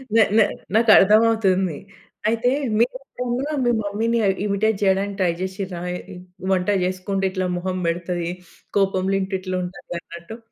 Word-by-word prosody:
నా 225 - +7
నా 220 - +7 0.3
నాకు 225 +1 +4
అర్థం 210 +3 +6
అవుతుంది. 190 -7 +1 0.5
అయితే 230 +2 +1 0.3
మీరు 240 +2 +2 0.4
కూడా 285 +3 -3
మీ 240 - +3
మమ్మీ‌ని 220 +3 0 0.3
ఇమిటేట్ 210 +1 +1
చేయడానికి 195 +1 +1
ట్రై 180 -2 +3
చేసిం‌డ్రా? 190 -2 -4
ఏ - - -5
ఇ - - -9 0.4
వంట 185 -1 +1 0.2
చేసుకుంటే 190 +1 -2
ఇట్లా 185 -1 -1
మొహం 185 +1 -3
పెడతది, 175 0 -2 0.5
కోపం‌లో 195 -1 +1
ఇంటి 190 0 -3
ఇట్లా 185 0 -4
ఉంటది 180 0 -8
అన్నట్టు. 170 +7 -10
195 Hz, 150 wpm, -22 LUFS, 185-215 Hz, 0.5 s, నా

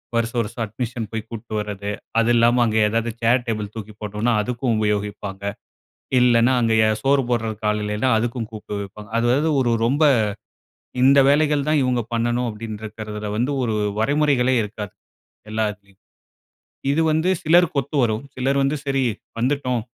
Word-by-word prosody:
வருஷம், 115 +1 0
வருஷம் 115 +1 -4
அட்மிஷன் 115 0 -4
போய் 110 -1 -4
கூட்டிட்டு 115 -1 -7
வர்றது, 100 -1 -5 0.3
அது 115 +1 +2
இல்லாம 120 +1 +4
அங்க 110 -1 0
ஏதாவது 115 +2 -1
சேர், 120 +2 +3
டேபிள் 105 -2 -3
தூக்கி 110 -1 -7
போட்டோம்னா 105 +3 -1
அதுக்கும் 120 +1 -1
உபயோகிப்பாங்க, 105 -2 -2 0.8
இல்லைன்னா 120 0 +4
அங்கே 115 -1 +2 0.3
சோறு 135 0 +3
போட்றதுக்கு 110 -2 -1
ஆள் 105 0 -1
இல்லனா, 105 +5 0
அதுக்கும் 115 -1 -2
கூப்பிட்டு 105 -1 -6
வைப்பாங்க. 105 +2 -10
அதாவது 130 +7 +2
ஒரு 120 -2 +1
ரொம்ப 140 +6 +1 1.0
இந்த 140 +1 +6
வேலைகள் 145 0 +2
தான் 155 -2 +3
இவங்க 125 -1 +1
பண்ணணும், 120 +1 0
அப்டின்னு 110 0 -7
இருக்கிறதில 105 -1 -6
வந்து 125 +5 0
ஒரு 110 -3 -1 0.2
வரைமுறைகளே 135 0 +2
இருக்காது 105 -1 -7 0.6
எல்லா 110 0 0
இதுலயும். 100 -2 -22 0.9
இது 155 +3 +2
வந்து 160 +4 +1
சிலருக்கு 170 -1 +4
ஒத்து 145 +3 -5
வரும். 110 0 0
சிலர் 135 +2 +1
வந்து 135 +2 +1
சரி 135 -1 +1 0.4
வந்துட்டோம். 125 -2 0
115 Hz, 150 wpm, -22 LUFS, 105-130 Hz, 1.0 s, இந்த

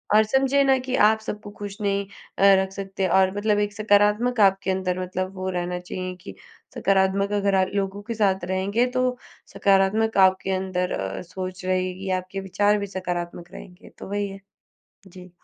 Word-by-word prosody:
और 215 - +7
समझिए 270 +4 +2
ना 270 -1 +4
कि 255 0 -3
आप 220 0 +4
सबको 210 -1 -7
खुश 205 -1 -6
नहीं 200 -1 0 0.3
अ, - - +1 0.2
रख 190 0 -4
सकते 195 -1 -3
और 190 +1 +3
मतलब 210 0 +1
एक 205 0 -1
सकारात्मक 210 +3 +2
आपके 195 -1 +3
अंदर 185 -1 -1
मतलब 185 +1 -4
वो 185 0 -3
रहना 180 -1 -3
चाहिए 185 +1 -6
कि 200 - -10 0.4
सकारात्मक 195 +1 +1
अगर 200 -1 +1
अ, 190 0 +3
लोगों 200 0 -2
के 230 - -4
साथ 195 -4 +1
रहेंगे, 190 +6 0
तो 255 0 -1 0.4
सकारात्मक 200 +3 +2
आपके 190 +1 -2
अंदर 185 -1 -2
अ, 95 0 -4
सोच 185 +1 -7
रहेगी, 185 +1 -2
आपके 185 +2 -7
विचार 205 +2 +1
भी 200 - -4
सकारात्मक 175 -2 -5
रहेंगे। 180 0 -12
तो - - -8
वही 205 0 -1
है। 195 0 -9 0.7
जी। 180 0 -13
195 Hz, 175 wpm, -24 LUFS, 185-205 Hz, 0.7 s, और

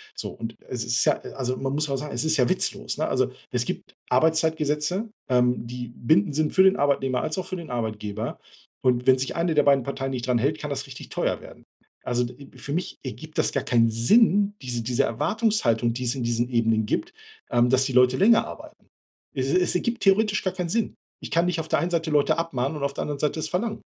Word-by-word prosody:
So 420 - -5
und 115 -1 -7
es 125 -3 -3
ist 120 +1 +1
ja - - +3 0.2
also, 130 -1 -2
man 135 0 -2
muss 150 0 -1
auch 140 - 0
sagen, 150 +2 -6
es - - -2
ist 160 0 +2
ja 125 -2 +3
witzlos, - - -2
ne? - - 0
Also, - - +1 0.2
es - - 0
gibt - - -6 0.2
Arbeitszeitgesetze, 160 - +1 0.2
ähm, 125 -1 +2
die 125 0 -6
bindend 160 +4 +2
sind 155 -1 +1
für 190 - +6
den 190 0 +6
Arbeitnehmer 135 -3 +1
als 155 +3 -3
auch 185 - -2
für 185 - -4
den 170 -4 -8
Arbeitgeber. 110 -2 -4 0.4
Und 125 -1 +1
wenn 130 0 +7
sich 130 - -3
eine 165 0 +1
der 150 - +5
beiden 140 -2 +4
Parteien 135 -1 -3
nicht 125 -1 -4
dran 125 -2 +3
hält, 145 +6 0
kann 150 - -5
das 140 0 -3
richtig 130 - -10
teuer - - -1
werden. - - -14 0.4
Also, 125 0 0
d 120 - -5 0.2
äh, - - -16
für 140 - -7
mich 175 +2 -3
ergibt 155 +4 -8
das - - +2
gar 135 - -1
keinen 115 -1 +3
Sinn, 200 - +4
diese 120 -2 -3
diese 120 +1 +1
Erwartungshaltung, 125 - +1
die 125 - -4
es 120 - +1
in 130 - -4
diesen 120 +1 0
Ebenen 115 -2 +2
gibt, 345 - -2 0.4
ähm, 120 +1 +3
dass 130 0 +4
die 130 - -2
Leute 125 0 +5
länger 225 +3 +5
arbeiten. - - -11 0.5
Es 130 0 -1
es 180 -1 +2
ergibt 235 +6 -1
theoretisch 210 +2 +3
gar 185 - -1
keinen 180 -2 -3
Sinn. 225 +3 0 0.3
Ich - - -8
kann 170 +1 +3
nicht 175 -2 0
auf 160 - -4
der - - +2
einen 170 - -1
Seite 165 -2 0
Leute 145 +1 +3
abmahnen 145 -3 -2
und 145 - -5
auf 140 0 -1
der - - -4
anderen 145 -1 -3
Seite 150 +2 0
es - - -3
verlangen. 215 +5 -2
140 Hz, 235 wpm, -25 LUFS, 125-165 Hz, 0.5 s, wenn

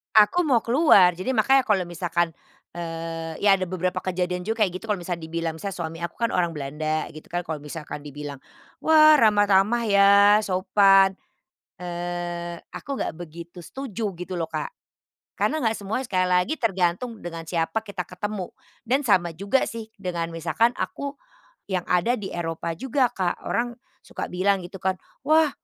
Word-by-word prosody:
Aku 265 +12 +5
mau 245 -6 +3
keluar. 215 - +5
Jadi 255 +8 -2
makanya 265 +4 +4
kalau 200 -3 +2
misalkan, 175 -1 0 0.5
eee 165 -1 -5
ya 200 -1 +5
ada 185 - -2
beberapa 185 0 -2
kejadian 180 0 -2
juga 225 0 -2
kayak 185 -3 +2
gitu 225 - -12
kalau 205 -4 -1
misalnya 170 -2 -4
dibilang 165 0 -3
misalnya 200 +2 -5
suami 165 -2 -5
aku - - -8
kan 230 - +2
orang 175 -2 0
Belanda 155 +2 -3
gitu 155 - -12
kan, 175 - 0
kalau 160 -3 -4
misalkan 150 0 -8
dibilang, 145 -1 -7 0.4
"Wah, 310 -1 +6
ramah-ramah 205 0 +4
ya, 200 0 +6 0.3
sopan," 195 +1 +4 0.6
eee, 175 -1 -4
aku - - -10
nggak - - -2
begitu 170 +1 -10
setuju 225 -7 -4
gitu 180 +1 -6
loh, 165 - -1
Kak. - - -4 0.6
Karena 315 - 0
nggak 220 - +3
semuanya, 220 +6 -2
sekali 185 -4 +1
lagi 180 +10 +2
tergantung 195 +3 0
dengan 165 -1 -5
siapa 165 +5 -1
kita 200 -4 -6
ketemu, 190 0 -5 0.3
dan 265 +5 +2
sama 180 - +2
juga 200 +10 +1
sih 225 -1 -7
dengan 175 -4 -3
misalkan 175 +9 0
aku 280 0 -4 0.5
yang 185 -3 -1
ada 180 +7 +3
di 205 -5 -4
Eropa 165 -1 -4
juga 265 0 +1
Kak, 180 -2 -3
orang 240 0 0 0.3
suka - - -6
bilang 190 +2 +1
gitu 180 +2 -9
kan, 190 +1 0 0.3
"Wah, 310 0 +5
185 Hz, 165 wpm, -24 LUFS, 170-215 Hz, 0.6 s, Wah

